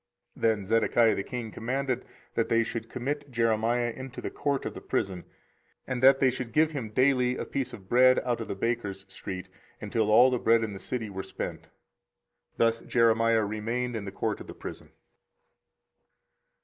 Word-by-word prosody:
24:037:021 -, -, -15 dB
Then 110 Hz, -3 st, +2 dB
Zedekiah 115 Hz, +1 st, +3 dB
the 100 Hz, -, -2 dB
king 120 Hz, -2 st, -5 dB
commanded 130 Hz, +3 st, -2 dB, 0.3 s
that 115 Hz, -, 0 dB
they 115 Hz, 0 st, +4 dB
should 115 Hz, 0 st, -5 dB
commit 145 Hz, +3 st, -3 dB
Jeremiah 115 Hz, 0 st, +1 dB
into 130 Hz, -1 st, -8 dB
the -, -, -4 dB
court 140 Hz, -1 st, -1 dB
of -, -, -3 dB
the -, -, -9 dB
prison, 90 Hz, -3 st, -2 dB, 0.6 s
and 125 Hz, -2 st, -3 dB
that 135 Hz, +1 st, +7 dB
they 130 Hz, -2 st, +4 dB
should 125 Hz, -2 st, -6 dB
give 155 Hz, 0 st, +4 dB
him 130 Hz, -8 st, -4 dB
daily 125 Hz, +1 st, +2 dB
a -, -, -3 dB
piece 135 Hz, -2 st, -3 dB
of 95 Hz, -4 st, -11 dB
bread 130 Hz, +3 st, +6 dB
out 120 Hz, -2 st, 0 dB
of 115 Hz, -, -5 dB
the -, -, -3 dB
bakers' 100 Hz, -3 st, -2 dB
street, 95 Hz, -2 st, -7 dB, 0.3 s
until 110 Hz, -2 st, -1 dB
all 125 Hz, +4 st, +7 dB
the 125 Hz, -, 0 dB
bread 115 Hz, 0 st, +4 dB
in 110 Hz, -2 st, -3 dB
the 95 Hz, -, -7 dB
city 110 Hz, -2 st, -4 dB
were 95 Hz, 0 st, -4 dB
spent. 95 Hz, -, -6 dB, 0.9 s
Thus 115 Hz, 0 st, +2 dB
Jeremiah 115 Hz, -1 st, +3 dB
remained 115 Hz, +4 st, -2 dB
in 105 Hz, -3 st, -4 dB
the 100 Hz, -, -5 dB
court -, -, -2 dB
of -, -, -10 dB
the -, -, -9 dB
prison. -, -, -9 dB
115 Hz, 185 wpm, -28 LUFS, 110-125 Hz, 0.9 s, that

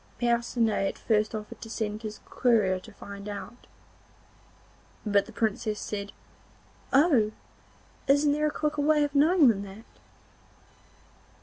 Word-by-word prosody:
Percinet 235 Hz, -3 st, +1 dB
at -, -, -4 dB
first 215 Hz, -1 st, +1 dB
offered 210 Hz, -1 st, -7 dB
to 225 Hz, -, -8 dB
send 215 Hz, -1 st, -3 dB
his 215 Hz, -2 st, -7 dB
courier 215 Hz, -7 st, +2 dB
to 220 Hz, -, -14 dB
find 200 Hz, 0 st, -9 dB
out, 205 Hz, +4 st, -8 dB, 1.4 s
but 200 Hz, -1 st, +2 dB
the -, -, -10 dB
Princess 215 Hz, -1 st, -1 dB
said: 200 Hz, -1 st, -5 dB, 0.8 s
'Oh! 270 Hz, -7 st, +4 dB, 0.8 s
isn't 285 Hz, +1 st, +4 dB
there 300 Hz, +1 st, +1 dB
a -, -, -1 dB
quicker 300 Hz, -1 st, -1 dB
way 300 Hz, 0 st, +3 dB
of 290 Hz, -1 st, -2 dB
knowing 305 Hz, +2 st, +5 dB
than 210 Hz, -4 st, +3 dB
that? 200 Hz, +3 st, -10 dB
225 Hz, 130 wpm, -28 LUFS, 210-285 Hz, 1.4 s, knowing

